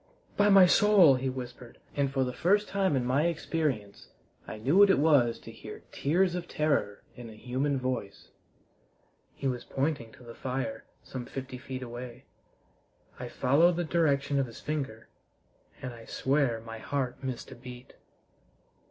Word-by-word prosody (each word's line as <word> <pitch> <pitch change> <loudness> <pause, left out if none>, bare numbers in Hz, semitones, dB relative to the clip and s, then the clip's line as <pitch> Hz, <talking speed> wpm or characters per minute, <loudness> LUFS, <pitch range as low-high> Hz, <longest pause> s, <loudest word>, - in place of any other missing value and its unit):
By 205 0 +4
my 195 -2 +8
soul!" 190 -5 +6
he 130 +1 -1
whispered, 125 -2 -8 0.2
and 140 -2 +1
for 135 -1 +1
the 125 -1 -3
first 205 +8 +2
time 190 -5 +1
in 125 -2 0
my 140 +6 +2
experience 150 -10 -3 0.4
I - - -6
knew 135 - +1
what 200 0 +8
it 195 - +5
was 140 -6 +4
to - - -11
hear - - -10
tears 175 +5 +1
of 175 -1 -4
terror 140 -9 0
in 120 -2 -9
a 110 - -11
human 130 +5 -1
voice. 130 -6 -4 1.1
He - - -8
was 125 -2 -1
pointing 135 -4 -2
to - - -16
the 120 -1 -10
fire, 135 - -4 0.2
some 125 -2 -7
fifty 130 -1 -7
feet 130 -1 -6
away. 120 0 -8 0.9
I 125 -1 -5
followed 155 +9 +3
the 175 - -1
direction 145 -4 +1
of 135 - 0
his 115 - -11
finger, 135 -8 -4 0.8
and 130 - -4
I 115 -1 -12
swear 135 -4 0
my 115 0 -8
heart 135 +1 -3
missed 130 -2 -5
a - - -8
beat. 125 0 -11
135 Hz, 165 wpm, -29 LUFS, 125-155 Hz, 1.1 s, my